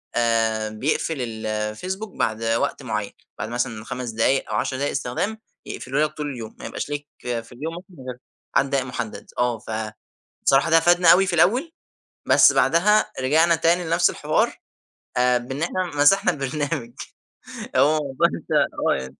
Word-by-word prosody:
آآ 115 -2 +1
بيقْفل 140 +6 -1 0.2
الفيسبوك 110 - -4
بعد 110 +1 -1
وقت 115 +1 0
معين، - - -3 0.3
بعد - - -3
مثلًا 120 -2 -3
5 125 -1 -5
دقايق 115 +4 +1
أو - - -1
10 130 - -1
دقايق 140 +2 -1
استخدام، 145 - -2 0.3
يقفله 135 +4 -2
لك 155 - 0
طول 150 -1 -3
اليوم، 115 -4 -8
ما - - -8
يبقاش - - -5
ليك 145 0 -4
في 115 -2 -4
اليوم 150 +7 -5
ممكن 175 -6 -12
غير 125 -1 -6 0.4
عدد 135 - +3
دقايق 135 -2 0
مُحدد. 125 -4 -6
آه 120 -2 +1
فبصراحة 110 0 -7 0.6
ده 165 0 +6
فادنا 175 +1 +4
أوي 195 +2 +4
في 185 - -2
الأول، 250 - +3 0.6
بس - - +7
بعدها 210 +6 +3
رجعنا 160 +6 +4
تاني 170 +2 +2
لنفس 170 +1 +3
الحوار - - 0 0.6
آآ 125 0 +4
بإن 130 +4 -6
إحنا 185 +2 -1
مسَحنا 180 +6 +5
البرنامج، 140 -3 -3 0.8
آه 155 +2 +4 0.2
بانسى - - +1 0.6
آه. - - -23
135 Hz, 155 wpm, -23 LUFS, 120-165 Hz, 0.8 s, بس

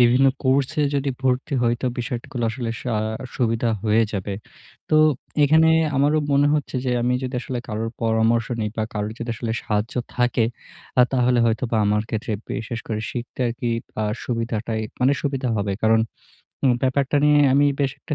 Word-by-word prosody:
বিভিন্ন 125 +3 +5 0.2
কোর্সে 140 +3 +2
যদি 140 0 0
ভর্তি 130 +2 0
হই 120 0 +3
তো 130 - +1
বিষয়গুলো 125 0 -3
আসলে 120 0 -4
স - - -10 0.5
সুবিধা 115 -1 +1 0.2
হয়ে 110 +1 +4
যাবে। 100 0 -3 0.6
তো - - +1 0.5
এখানে 160 +3 +5 0.3
আমারও 145 +3 +3
মনে 140 +1 +4
হচ্ছে 145 -2 -2
যে 125 - 0
আমি 125 +1 +2
যদি 130 0 -4
আসলে 125 0 -4
কারোর 110 +1 -2
পরামর্শ 115 0 +2
নেই 105 - 0
বা, 110 - 0
কারোর 105 0 -2
যদি 120 0 -4
আসলে 115 -2 -3
সাহায্য 105 +1 -2 0.2
থাকে, 125 -1 +2 0.5
আ - - +9
তাহলে 125 -1 +3
হয়তোবা 115 +1 0
আমার 105 +1 +2
ক্ষেত্রে 110 0 -3 0.2
বিশেষ 115 +1 -4
করে 110 -2 -2
শিখতে 120 +1 -6
আরকি 120 +1 -4 0.3
আ - - 0 0.2
সুবিধা্টা 115 -1 -2 0.3
মানে 130 +3 +4
সুবিধা 135 -3 -1
হবে। 100 -1 -1
কারণ 110 0 +4 0.8
ব্যাপারটা 135 +2 +1
নিয়ে 150 0 +5
আমি 140 +2 +4 0.2
বেশ 135 -2 +2
একটা 150 - -4
120 Hz, 165 wpm, -22 LUFS, 115-135 Hz, 0.8 s, আ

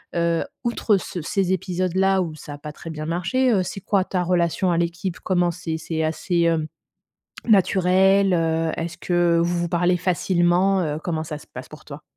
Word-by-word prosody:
heu, 170 -1 +1 0.2
outre 235 -3 +1
ce 180 -2 -6
ces 190 +3 0
épisodes-là 185 +1 +1
où 165 -3 -3
ça 150 -1 -9
a - - -8
pas 150 0 -7
très 165 - -10
bien 155 -1 -6
marché, 185 +10 +1
heu, 190 - +3
c'est 195 - -6
quoi 195 -2 +1
ta 180 -2 -2
relation 175 0 +1
à 170 - +1
l'équipe? 170 +1 -2
Comment 175 -2 +1
c'est? 165 -2 -4
C'est 160 0 -3
assez, 170 +2 -1
hem, 165 -2 +1 0.8
naturel, 190 -1 +4
heu, 165 -1 0
est-ce 165 +1 -5
que 175 -1 +2
vous 175 +1 0
vous 170 - -1
parlez 175 +1 +2
facilement? 180 +1 +2
Heu, 150 -1 -2
comment 160 -3 -2
ça 150 -1 -6
se - - -16
passe - - -10
pour - - -13
toi? - - -10
175 Hz, 190 wpm, -22 LUFS, 165-185 Hz, 0.8 s, naturel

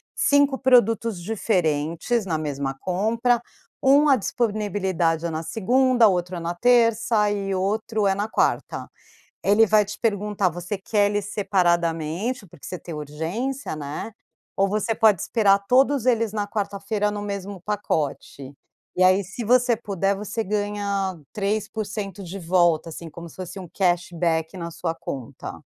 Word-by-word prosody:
5 285 -1 +3
produtos 230 -6 +3
diferentes 180 0 0
na 165 -4 -1
mesma 140 -3 -3
compra, 230 - +1 0.4
1 280 +3 +5
a 280 - +6
disponibilidade 195 -8 -1
é - - 0
na 160 +1 -3
segunda, 245 +5 +3
outro 180 -2 -1
na 170 +1 -3
terça 230 -1 +3
e 195 -1 -2
outro 210 +2 0
é 195 - +2
na 205 +2 -2
quarta. - - -1 0.5
Ele 205 +3 +5
vai 210 -1 +4
te 210 +1 -7
perguntar: 205 -4 0
"Você 175 +4 -5
quer 205 +1 +1
eles 205 -1 -1
separadamente, 175 - 0
porque 165 -3 -15
você 180 - -5
tem 170 - -8
urgência, 165 - -4
né, 150 +8 -5 0.5
ou 195 +1 +3
você 215 +3 0
pode 215 -6 +4
esperar 200 -4 +3
todos 265 0 +4
eles 230 -4 +2
na 205 -1 -2
quarta 200 -1 -3
feira 210 +1 0
no 205 0 -4
mesmo 200 -2 -5
pacote?". 155 -8 -3 0.4
E 185 - +4
aí 185 +1 +4
se 200 +6 -6
você 245 +1 +4
puder, 200 -3 -1
você 210 +3 -4
ganha 205 -3 -2
3% 205 -1 -3
de 185 +2 -7
volta, 170 -2 +2
assim, 165 +1 -8
como 170 +2 -10
se 165 - -15
fosse 185 +1 -7
um 185 - -8
cash 175 0 +1
back 165 0 -1
na 170 -1 -5
sua 165 0 -3
conta. 130 -6 -7
200 Hz, 150 wpm, -24 LUFS, 175-220 Hz, 0.5 s, a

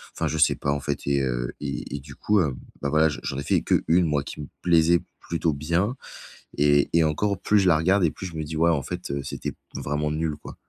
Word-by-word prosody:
enfin, - - -1
je 80 - -2
sais 80 - +4
pas 70 - -1
en 70 - 0
fait 70 0 -3
et 70 0 +2
heu - - -1
et - - -5
et - - -6
du 70 0 -12
coup, 105 -1 +2
hem, 70 -6 0 0.3
bah 70 - -1
voilà, 80 +1 +4
j'en 75 - -5
j'en 65 - -3
ai - - -4
fait - - +2
que - - +1
1 85 +2 +5
moi 75 -3 0
qui - - -8
me 75 - -7
plaisait 85 0 +4 0.2
plutôt 85 -1 -1
bien 85 - 0 0.6
et 70 -1 +4
et 85 -1 +5
encore 100 +6 0
plus 105 -1 +3
je 95 - +2
la 85 - +6
regarde 95 +4 +3
et 80 - +2
plus 95 - -7
je 85 - -10
me 80 - -2
dis: 80 +1 -6
«Ouais 85 +1 +4
en 70 -4 +1
fait 90 -4 -5
c'était - - -4
p - - -19 0.2
vraiment 75 +1 -2
nul 80 0 -1
quoi». - - -9
80 Hz, 265 wpm, -25 LUFS, 70-85 Hz, 0.6 s, la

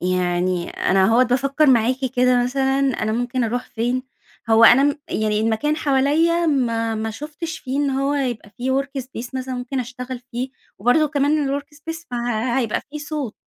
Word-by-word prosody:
يعني 180 0 0
أنا 190 0 +2
أهوّة 230 +5 +5
بافكر 275 +5 +2
معاكِ 250 -1 +4 0.2
كده 250 0 +4
مثلًا 270 +1 0 0.2
أنا 215 - 0
ممكن 245 +1 -1
أروح 245 +2 -2
فين، 245 +3 -1 0.5
هو 225 +1 +7
أنا 245 +4 +8
م 290 - +2 0.2
يعني 215 -1 0
المكان 225 +8 0
حواليا 310 +5 +2
ما 230 -6 +1
ما 220 0 -3
شُفتش 310 +6 -6
فيه 265 0 -4
إن 285 -1 +1
هو 275 +2 0
يبقى 245 -7 -2
في 255 +4 -3
workspace 265 -3 -7
مثلًا 260 0 -3
مُمكن 250 +1 -3
أشتغل 250 0 -6
فيه 250 +2 -3 0.3
وبرضو 270 +8 +3
كمان 285 -1 +1
الworkspace 325 +3 -9
فَهَيبقى 240 0 -1
في 300 - -6
صوت، 290 -5 -5
255 Hz, 160 wpm, -21 LUFS, 230-285 Hz, 0.5 s, أنا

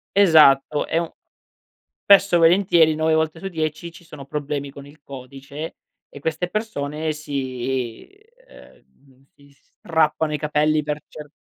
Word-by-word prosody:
Esatto, 155 -6 +5
è 165 - -1
un 170 -1 -1 0.9
spesso 200 -2 +5
e - - +6
volentieri 170 -2 +4
9 160 +1 0
volte 160 0 0
su 195 - -6
10 160 -1 -4
ci 175 - -15
sono 150 -4 -12
problemi 140 0 -4
con 140 0 -12
il 145 +2 -17
codice, 140 +3 -9 0.3
e - - -12
queste 160 +4 -3
persone 155 -8 -3
si 130 - -4 0.4
uhm, 135 -1 -21
si 140 0 -22
strappano 155 +1 -1
i 150 - -1
capelli 150 +1 0
per 150 0 -4
cer 150 -1 -11
150 Hz, 140 wpm, -21 LUFS, 140-160 Hz, 0.9 s, e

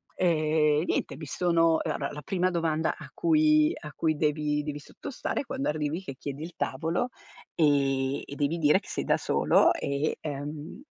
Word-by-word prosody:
ehm, 155 -3 +2
niente, - - -1
mi 155 - -7
sono 165 0 +2
ehm, 155 - -1
allora 140 - -3
la 150 - -7
prima 185 +2 +1
domanda 165 -2 0
a - - -10
cui 310 -2 +4
a 150 - -8
cui 155 +1 0
devi 150 -1 0
devi 150 0 -4
sottostare 250 - -5
quando 270 +1 -2
arrivi 150 +3 -2
che 135 - -7
chiedi 140 +1 -6
il 170 +2 -7
tavolo 165 - -1 0.4
e 140 -3 +2
e 140 - -8
devi 145 +3 0
dire 155 +2 +4
che - - -18
sei - - -2
da - - +2
solo - - +3
e, 140 +2 -1
ehm, 150 - -6
155 Hz, 175 wpm, -28 LUFS, 145-170 Hz, 0.4 s, cui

